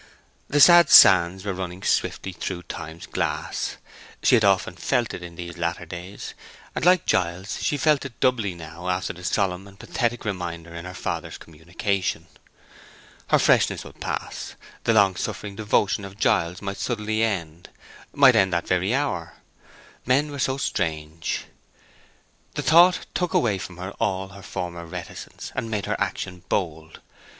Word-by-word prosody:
The 145 - +1
sad 175 +2 +8
sands 95 +1 +7
were 100 - -1
running 90 0 -6
swiftly 95 - 0
through 90 0 -5
Time's 80 -1 -8
glass; - - -3 0.5
she - - +4
had 115 -3 +5
often 100 -2 +3
felt - - 0
it - - -6
in 85 -1 -9
these 85 0 -8
latter 85 0 -2
days; 90 +4 -8 0.4
and, - - -3
like 180 0 +5
Giles, 90 +3 -1
she 145 - 0
felt 150 -1 +3
it 135 -4 -9
doubly 110 -8 +1
now 85 +2 -7
after 90 0 -1
the 90 - -13
solemn 95 0 -1
and 100 0 -16
pathetic 120 -1 -2
reminder 85 -4 -4
in 85 +1 -7
her 90 0 -8
father's - - -4
communication. 85 +4 -3 1.0
Her - - +4
freshness - - +3
would - - -13
pass, - - -5 0.3
the 115 - +4
long 100 -4 +4
suffering 100 +4 -4
devotion 105 -1 +1
of 100 0 -9
Giles 90 -2 +1
might 100 0 -4
suddenly 110 -2 -1
end—might 105 - 0
end 95 -3 +4
that 85 - -1
very 95 +6 +1
hour. 135 - -2 0.7
Men 140 +4 +2
were 140 - -6
so 130 +1 0
strange. 80 - -2 1.1
The - - -2
thought 175 +3 +5
took 180 -2 -1
away 105 -5 +2
from 90 -1 -8
her 95 +2 -6
all 95 -4 -1
her 100 +1 -12
former 90 -3 -5
reticence, 90 +1 -8
and 115 - -3
made 105 -3 -2
her - - -2
action 90 -2 -3
bold. 80 -5 -3
95 Hz, 160 wpm, -24 LUFS, 85-110 Hz, 1.1 s, sad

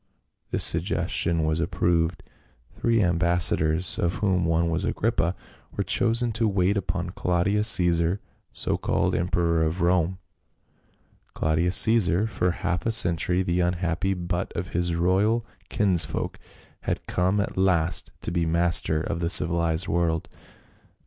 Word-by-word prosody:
This - - +1
suggestion 85 -1 +1
was 80 +1 -1
approved; 85 -1 -1 0.6
three 115 -2 +2
ambassadors, 85 -1 +1
of 85 +1 0
whom 95 -4 0
one 85 0 +1
was 85 +3 -1
Agrippa, 95 -4 -1 0.4
were - - 0
chosen 115 +1 +2
to 115 +1 0
wait 95 0 +1
upon 90 -2 -3
Claudius 95 +4 0
Caesar, 85 -2 +3 0.3
so - - -2
called - - -1
emperor 85 -1 0
of 80 +3 -2
Rome. 90 +1 +1 1.2
Claudius 80 +3 0
Caesar, 110 -4 +4
for 100 -5 -1
half 90 +1 -3
a - - +1
century 90 -3 +2
the 90 -1 -1
unhappy 90 +2 -1
butt 90 0 -4
of 90 +2 -4
his 85 0 -2
royal 100 +7 +1 0.2
kinsfolk, 95 -5 0 0.4
had - - -4
come 95 +3 0
at 100 - -3
last 90 -3 +1
to - - -3
be 85 -1 0
master 85 -1 +1
of 80 - -4
the 85 -1 -1
civilized 85 +1 +2
world. 85 -1 -1
90 Hz, 135 wpm, -24 LUFS, 85-95 Hz, 1.2 s, Caesar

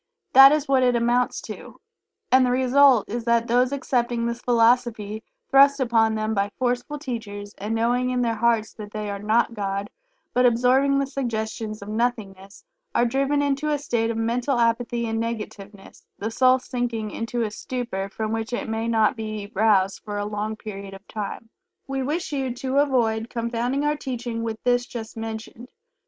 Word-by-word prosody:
That 270 +1 +10
is 300 -1 +1
what 270 -1 +3
it 250 -1 +3
amounts 240 +1 +1
to, - - -10 0.5
and 260 0 +6
the 250 - +2
result 260 -1 +4
is 235 +2 -4
that 235 0 +2
those 245 +2 +2
accepting 240 -4 -1
this 235 +1 -3
philosophy 230 -3 +2 0.3
thrust 280 +1 +6
upon 225 -3 +2
them 215 0 -1
by 200 -1 0
forceful 250 +3 -1
teachers, 215 -7 -6
and 210 +3 -2
knowing 245 +2 +1
in 250 -1 0
their 230 -1 +1
hearts 225 -1 +1
that 210 -1 -10
they 210 -1 -4
are 200 - -5
not 225 +3 +1
God, 200 -1 -3 0.4
but 250 - +3
absorbing 255 +3 +3
the 275 - +1
suggestions 220 -5 -4
of - - -11
"nothingness," 210 - -3 0.3
are 240 - +4
driven 275 +4 +1
into 285 +2 0
a 295 - +1
state 235 -5 -1
of 230 - -2
mental 240 +4 0
apathy 235 0 +1
and 225 0 -2
negativeness, 210 -3 -7
the 220 +2 -4
soul 255 +2 +4
sinking 240 -4 -3
into 230 +1 -2
a 215 - -2
stupor 225 -5 -4
from 215 +1 -4
which 225 +2 -3
it 260 +3 -2
may 225 +1 -2
not 225 +2 +2
be 215 -2 -6
roused 195 -2 +2
for 205 -1 -5
a 205 - -2
long 210 +1 -3
period 200 -2 -8
of 195 +1 -15
time. 215 +1 -6 0.3
We 270 0 -3
wish 310 +7 -2
you 265 -2 -1
to 265 +1 0
avoid 235 -5 +1
confounding 240 +4 -1
our 295 0 +2
teaching 245 -4 -4
with 225 -1 -4
this 245 0 +2
just 225 -2 -7
mentioned. 225 +2 -7
235 Hz, 180 wpm, -24 LUFS, 220-255 Hz, 0.5 s, That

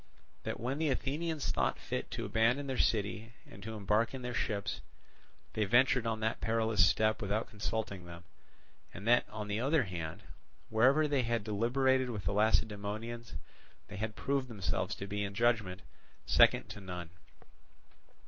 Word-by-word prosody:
That - - -3
when 130 +5 -2
the 160 -2 +1
Athenians 145 0 -1
thought 65 -10 0
fit - - -4
to - - -4
abandon 115 +6 +2
their 135 -1 -2
city 110 +1 0
and 100 - -13
to 110 +2 -6
embark 105 +4 +1
in 130 - -7
their 125 0 -3
ships, 105 -3 -2 0.7
they 110 - +1
ventured 120 +2 +4
on 110 -1 -1
that 110 +1 -1
perilous 110 -3 +3
step 110 0 +1
without 105 +2 -1
consulting 105 -3 -3
them; 85 0 -10 0.7
and 100 +5 -7
that 120 +1 +4
on 105 -1 -5
the 105 +1 -1
other 140 +3 +3
hand, 85 -1 -5 0.5
wherever 130 +8 +4
they 145 -3 +2
had 115 -2 -1
deliberated 125 +5 +2
with 105 -7 -5
the 90 - 0
Lacedaemonians, 110 0 0 0.5
they 100 - -7
had 110 +1 -3
proved 135 -1 -1
themselves 105 -5 -2
to 100 - -6
be 100 +1 -2
in 100 -1 -4
judgment 110 -5 +1 0.4
second - - +5
to 105 - -8
none. 90 -3 -6
110 Hz, 160 wpm, -33 LUFS, 100-120 Hz, 0.7 s, second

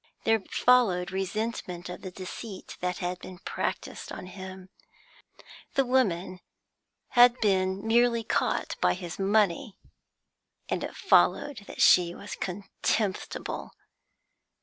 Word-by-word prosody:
There 225 0 +3
followed 195 -5 +3
resentment 195 -2 -3
of 180 - -7
the 190 - -6
deceit 185 +2 -8
that 180 0 -2
had 180 0 -3
been 185 0 -10
practised - - -4
on - - -7
him; 185 0 -9 1.1
the 275 -2 +3
woman 190 -8 +1 0.7
had 245 0 +6
been 190 -1 +1
merely 235 0 +3
caught - - 0
by 90 0 +3
his 175 +1 -7
money, 205 +3 +1 0.9
and - - -2
it - - -5
followed 275 -8 +3
that - - -1
she 175 -1 +6
was 205 - -7
contemptible. 195 +1 -3
195 Hz, 115 wpm, -28 LUFS, 180-225 Hz, 1.1 s, had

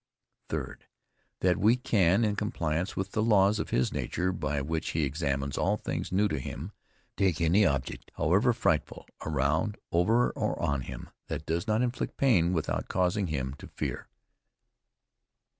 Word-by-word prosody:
THIRD. - - -4 0.6
That 90 0 +3
we 110 +5 +4
can, 105 -4 +3
in 105 -1 0
compliance 90 -5 -2
with 95 +1 -3
the 110 - 0
laws 105 -1 +4
of - - -3
his 65 - +1
nature 90 +1 -1
by 75 -5 -2
which 80 +3 -2
he 80 - +2
examines 70 -1 -1
all - - +2
things - - -4
new 100 +3 +3
to 75 -8 -2
him, 75 +7 -6 0.4
take 95 -5 +1
any 90 +5 +4
object, 70 -3 -3
however 100 - +3
frightful, 95 -9 -1 0.2
around, 80 +7 0
over 110 +8 +3
or - - -2
on 70 -1 0
him, - - -8 0.2
that 75 - -4
does 85 +2 -1
not 110 +3 +2
inflict 125 0 -3
pain, 95 -11 +3
without 80 -4 -1
causing 90 +2 +1
him 65 -4 -2
to - - -9
fear. - - -4
90 Hz, 160 wpm, -29 LUFS, 75-105 Hz, 0.6 s, we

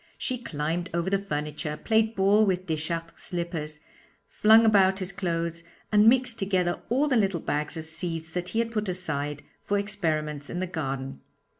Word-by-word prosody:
She 255 -1 -2
climbed 165 0 -2
over 170 +2 0
the 195 - +3
furniture, 150 -4 -4
played 220 +4 +1
ball 200 +3 +4
with 185 -3 0
Deschartres' 165 +1 -3
slippers, 165 -4 -4 0.4
flung 220 +2 +5
about 195 -3 +5
his 185 -1 -2
clothes, 170 -3 -2 0.3
and 210 +1 +6
mixed 250 -2 +2
together 185 -3 0
all 270 +6 +2
the 270 - +2
little 195 -6 +2
bags 150 +2 -1
of 160 - -4
seeds 165 0 -3
that 180 +1 -3
he - - -4
had 230 0 +1
put 215 -3 -2
aside 150 -5 -3 0.2
for 205 - 0
experiments 155 -8 -2
in 175 - -3
the 185 - 0
garden. 135 -6 -4
180 Hz, 170 wpm, -27 LUFS, 160-205 Hz, 0.4 s, and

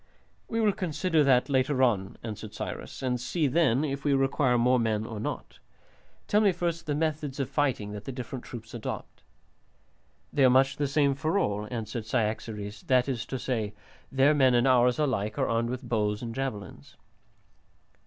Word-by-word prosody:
"We 230 - -2
will 215 -2 +4
consider 165 -3 0
that 130 -2 +4
later 130 -1 +2
on," 100 -6 +1
answered 110 -1 -7
Cyrus, - - -6
"and 125 -2 -1
see 150 +6 0
then 140 -2 +3
if 140 -1 -3
we 145 -2 +3
require 135 -1 +2
more 125 +2 +3
men 110 -2 0
or 110 -2 -6
not. - - -5 0.7
Tell 210 - +3
me 205 -2 +5
first 170 -2 -3
the 145 - 0
methods 150 -3 -2
of 135 -1 -2
fighting 130 -8 0
that 105 0 -7
the - - -4
different 125 0 -6
troops 115 -2 -9
adopt." 120 -3 -6 1.1
"They 140 - +3
are 130 - +7
much 135 +2 +3
the 145 - 0
same 140 0 +2
for 155 +6 -1
all," 105 - 0
answered 110 -1 -5
Cyaxares, 110 -2 -2
"that 125 -1 +3
is 125 -5 -3
to 130 - -3
say, 110 -5 -2 0.4
their 135 +2 +4
men 130 -4 +4
and 120 +1 +3
ours 125 -1 +4
alike 125 -8 -1
are 135 - +1
armed 115 +1 0
with 125 0 -5
bows 105 -1 0
and 115 -1 -4
javelins." 105 - -5
130 Hz, 180 wpm, -28 LUFS, 115-145 Hz, 1.1 s, are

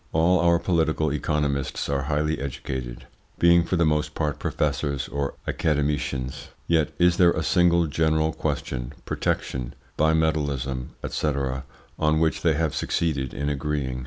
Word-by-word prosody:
All 85 +3 +4
our 85 0 +4
political 80 -4 +1
economists 70 -2 -1
are 70 -1 0
highly 75 +1 0
educated, 65 -2 -5 0.3
being 85 0 +5
for 90 - -1
the 85 -1 +3
most 75 0 0
part 75 -2 -1
professors 70 -3 -1
or 70 -1 -3
academicians, 70 -4 -1 0.2
yet 80 -3 +2
is 90 0 +4
there 85 -2 +5
a 80 - -2
single 85 +4 +4
general 80 0 +1
question 60 +1 -3
protection, 65 -1 -2 0.2
bimetallism, 75 -5 +1 0.2
&c. - - -2 0.7
on 75 0 +3
which 80 -1 +1
they 80 -3 +3
have 80 -1 0
succeeded 70 -6 -1
in 70 - -3
agreeing? 70 -3 -2
75 Hz, 135 wpm, -25 LUFS, 70-80 Hz, 0.7 s, being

